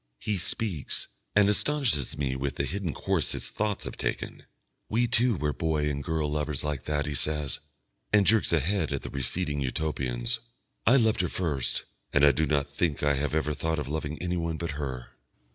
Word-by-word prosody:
He 105 - -1
speaks, 95 - -2 0.3
and 100 -1 +6
astonishes 105 - +1
me 70 -2 0
with 65 0 -2
the - - 0
hidden 95 -4 -2
course - - -1
his - - -3
thoughts 105 -1 -1
have - - -6
taken. - - -3 0.4
"We 120 +3 +3
two 120 0 +4
were 75 -2 0
boy 80 -2 0
and 70 0 -3
girl 80 +1 0
lovers 75 -2 -1
like 75 -3 -2
that," 75 -1 0
he 75 - -2
says, 75 +2 -1 0.5
and 105 -1 +5
jerks 110 +4 +4
a 85 -3 +4
head 85 0 0
at 70 - -3
the - - -6
receding 70 +3 -1
Utopians. 65 - -1 0.5
"I 120 - +8
loved 110 -6 +4
her 90 - 0
first, 75 -8 -1 0.3
and 70 0 +6
I 70 - +8
do 75 +3 +1
not 70 -1 +1
think 70 +1 -1
I 75 0 +4
have 70 +2 -1
ever 75 -1 +1
thought 80 +2 -1
of 75 -3 -3
loving 75 0 -3
anyone 85 -2 -1
but 85 0 -3
her." 65 -4 -4
75 Hz, 195 wpm, -28 LUFS, 70-90 Hz, 0.5 s, I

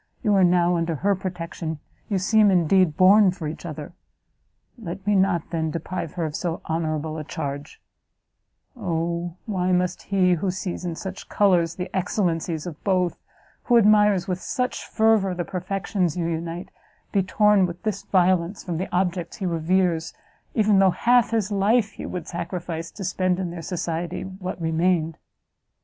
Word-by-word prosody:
you 210 -3 +3
are 195 -1 +5
now 175 0 +3
under 165 -1 -1
her 200 +7 +1
protection, 170 -3 -5 0.3
you 200 - +1
seem, 210 +3 +4
indeed, 180 -2 +3
born 195 +2 +7
for 180 -4 -4
each 160 +3 -6
other; 155 0 -7 0.8
let 195 -4 -7
me 205 - +2
not, 190 -4 +1
then, 160 -2 -1
deprive 165 +1 -4
her 170 -3 -2
of 155 -1 -4
so 170 -2 -2
honourable 160 -1 -2
a - - -4
charge 145 -1 -6 1.0
Oh, 170 -4 -2
why 185 -4 0
must 180 0 +1
he, 185 -2 +2
who 175 +3 -1
sees 185 0 -4
in 170 -2 -3
such 190 +3 -7
colours 175 -5 +3
the 180 +1 -6
excellencies 175 -4 -1
of 165 -4 -8
both, 180 -4 +1 0.5
who 240 - +5
admires 210 -4 +4
with 185 -1 -2
such 250 0 -2
fervour 220 -4 +2
the 175 -1 -3
perfections 185 -1 -2
you 170 - -1
unite, 165 +1 -4 0.4
be 200 - +3
torn 200 0 +3
with 175 0 -9
this 210 -3 -2
violence 185 0 +1
from 175 -3 -3
the 185 - -3
objects 180 -1 -1
he 195 - -4
reveres, 170 0 0 0.4
even 215 -3 +4
though 195 -1 +6
half 240 +5 +3
his 220 -3 0
life 210 +2 +2
he - - -7
would 180 -3 -5
sacrifice, 170 -1 -4
to 200 - -8
spend 185 0 0
in 180 -2 -3
their 170 -1 -6
society 175 0 -3
what 185 -1 -6
remained!" 165 0 0
180 Hz, 165 wpm, -24 LUFS, 165-195 Hz, 1.0 s, born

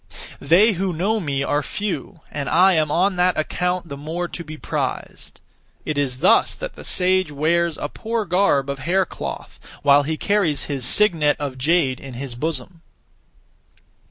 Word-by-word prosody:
They 180 +10 +5
who 190 -1 -2
know 200 +7 0
me 140 -6 -2
are 145 +1 0
few, 200 -1 -4
and 145 -1 -3
I 185 +3 +5
am 155 -3 +2
on 185 +5 +1
that 180 0 +2
account 180 +3 -1
(the 140 - -6
more) 160 +5 -4
to 170 - -6
be 155 -1 -9
prized. - - -5 0.5
It 155 - -2
is 135 -3 -1
thus - - +4
that - - -6
the - - -12
sage 185 -3 +1
wears 165 +3 +1
(a - - -3
poor 225 +6 -3
garb 175 -6 +2
of) 140 -1 -4
hair 180 +7 +1
cloth, - - -7 0.2
while 145 0 +6
he 155 +2 -3
carries 195 -8 +1
his 135 -4 -3
(signet 160 -2 +3
of) 135 -3 -5
jade 145 -3 +2
in 135 -3 -9
his 130 0 -6
bosom. 160 +5 -3
160 Hz, 170 wpm, -21 LUFS, 145-185 Hz, 0.5 s, while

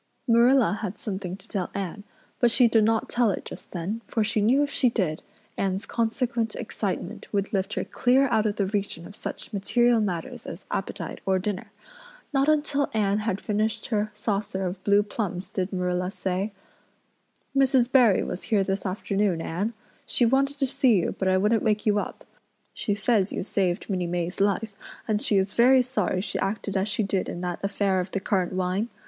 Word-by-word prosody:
Marilla 235 -2 +4
had 205 -2 -4
something 190 -4 -4
to 195 - -19
tell 190 -5 -2
Anne, 200 +1 -4 0.4
but 240 - +5
she 245 +1 +5
did 225 -1 +4
not 225 +1 +2
tell 240 -2 +2
it 195 - -3
just - - -9
then 190 +6 -4
for 225 - 0
she 210 0 0
knew 255 +7 +4
if 285 - -2
she 255 - +3
did 180 -9 -1 0.4
Anne's 195 +1 -1
consequent 230 0 -1
excitement - - -4
would 200 0 -1
lift 195 +1 -1
her - - -1
clear 260 +2 +3
out 220 -2 +2
of 205 - -1
the 200 - +1
region 195 -4 -3
of 200 - -11
such - - -6
material 235 +4 +3
matters 180 -6 -3
as 170 - -8
appetite 190 -3 -4
or 190 -1 +2
dinner. 190 +1 -3 0.6
Not 275 +1 +3
until 295 -2 +1
Anne 205 -1 +2
had 210 -3 -1
finished 215 0 -1
her 215 -2 0
saucer 200 -3 -2
of 180 +1 -4
blue 205 0 +4
plums 195 -3 -4
did 190 0 -2
Marilla 180 -1 -1
say: 195 +1 -2 1.0
"Mrs. 260 -2 +4
Barry 240 -8 +5
was 180 - -4
here 205 -3 +3
this 195 +1 -2
afternoon, 195 -1 0
Anne. 195 +8 -2 0.3
She 245 - +2
wanted 275 +4 +2
to 275 - +2
see 265 -3 +3
you, 175 - +1
but 190 - 0
I 185 0 +4
wouldn't 210 +3 +2
wake 210 -1 +1
you 210 -1 +3
up. - - -6 0.5
She 205 - -1
says 205 -2 +2
you - - -3
saved 185 -3 -1
Minnie 180 -3 -1
May's 175 +2 -2
life, 205 +2 +1 0.3
and 215 -1 +1
she 205 - +2
is 195 0 +1
very 255 +2 +6
sorry 250 -7 -1
she - - -3
acted 200 0 -2
as 195 +2 +1
she 210 +1 0
did 195 -1 -1
in 175 - -5
that 180 -1 -3
affair 200 -1 +1
of 180 +1 -3
the 195 - -2
currant 190 -2 0
wine. 185 +5 -1
205 Hz, 195 wpm, -26 LUFS, 190-230 Hz, 1.0 s, very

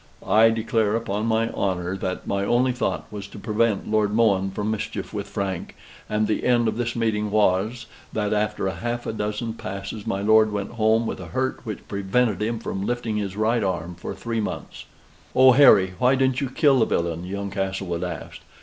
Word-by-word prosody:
I 110 +4 +5
declare 110 -1 +1
upon 110 -1 -2
my 115 0 +1
honor 90 -1 -1
that 95 -1 -4
my 100 0 -1
only 125 +5 +2
thought 125 - -2
was 100 -2 -6
to - - -12
prevent 105 0 0
Lord 105 -1 +2
Mohun 105 -4 +3
from 105 +2 -2
mischief 110 0 -4
with 100 -1 -4
Frank, 95 -3 -4 0.3
and 105 0 +1
the 105 - -1
end 120 -2 +3
of 110 - 0
this 120 -1 -2
meeting 110 -2 0
was, 105 +3 +1 0.3
that 105 -1 -1
after 105 -1 0
half 120 +7 -3
a - - -3
dozen 105 +2 -3
passes 100 0 -6
my 95 +1 -1
lord 110 0 +5
went 100 -1 -3
home 110 0 +2
with - - -4
a 90 - -8
hurt 130 +10 -2
which 105 - -6
prevented 100 +2 0
him 115 +2 -1
from 95 -3 -4
lifting 120 -1 -2
his 100 -2 -3
right 110 +1 +1
arm 90 -2 -2
for 90 - -7
three 115 -1 -3
months. 105 - -6 0.5
"Oh, 130 0 +8
Harry! 100 -9 +6
why 130 +1 +4
didn't 130 0 +1
you 135 - -1
kill 135 0 +3
the 110 - +4
villain?" 85 -2 -1
young 100 +2 -4
Castlewood 95 -3 -2
asked. 90 -4 -6
105 Hz, 195 wpm, -24 LUFS, 95-115 Hz, 0.5 s, Oh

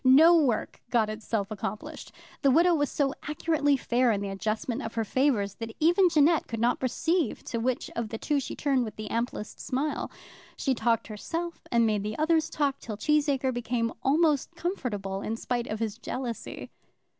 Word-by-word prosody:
No 300 +7 +8
work 270 -9 +1
got 220 -3 +2
itself 215 -1 -3
accomplished. 210 0 -5 0.3
The 275 - +4
widow 340 +6 +5
was 290 -3 +1
so 275 -2 0
accurately 300 -2 +1
fair 245 -1 +2
in 205 - 0
the 200 0 -3
adjustment 220 +5 -2
of 225 -5 -6
her 225 - +1
favours, 225 -5 +1
that 225 -1 -6
even 350 +4 +5
Jeannette 315 0 +3
could 230 - -4
not 240 +2 +2
perceive 320 +6 0
to 230 - -3
which 245 +2 -1
of 230 -2 -2
the 225 - -4
two 290 +5 0
she 265 - -5
turned 275 -4 +1
with 220 - -6
the 215 -1 -6
amplest 230 -2 -3
smile. 285 +4 -2 0.5
She 270 - +1
talked 230 -1 +1
herself 330 +11 -5
and 235 -1 +4
made 210 0 0
others 320 0 +2
talk, 280 -2 0
till 215 -3 -6
Cheesacre 285 0 +1
became 235 -1 -1
almost 300 +3 +2
comfortable, 210 - -3
in 220 - -2
spite 240 +1 -2
of 215 - -3
his 220 -3 -3
jealousy. 245 -3 -5
250 Hz, 180 wpm, -28 LUFS, 225-295 Hz, 0.5 s, No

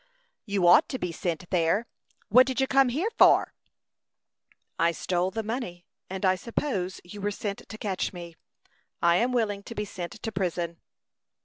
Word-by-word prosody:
"You 200 -3 +1
ought 175 +1 +6
to 260 - -3
be 180 -7 -3
sent 170 +1 -3
there. 180 +5 +2 0.4
What 250 +5 +7
did 260 0 -2
you 265 - +3
come 270 -1 +4
here 330 - -1
for?" - - +6 1.3
"I 170 0 +3
stole 180 +2 -1
the 225 +3 -4
money, 210 -6 -5 0.2
and 190 +1 -3
I 185 - +5
suppose 190 -2 -3
you 200 +3 -10
were 205 - 0
sent 205 0 -5
to 220 - -7
catch 195 -4 -2
me. 170 -3 -9 0.7
I 170 0 +5
am 245 +6 +1
willing 215 -5 0
to 230 - -9
be 210 - -2
sent 180 -2 -6
to 225 -1 -6
prison." 175 -3 -2
195 Hz, 175 wpm, -27 LUFS, 175-230 Hz, 1.3 s, What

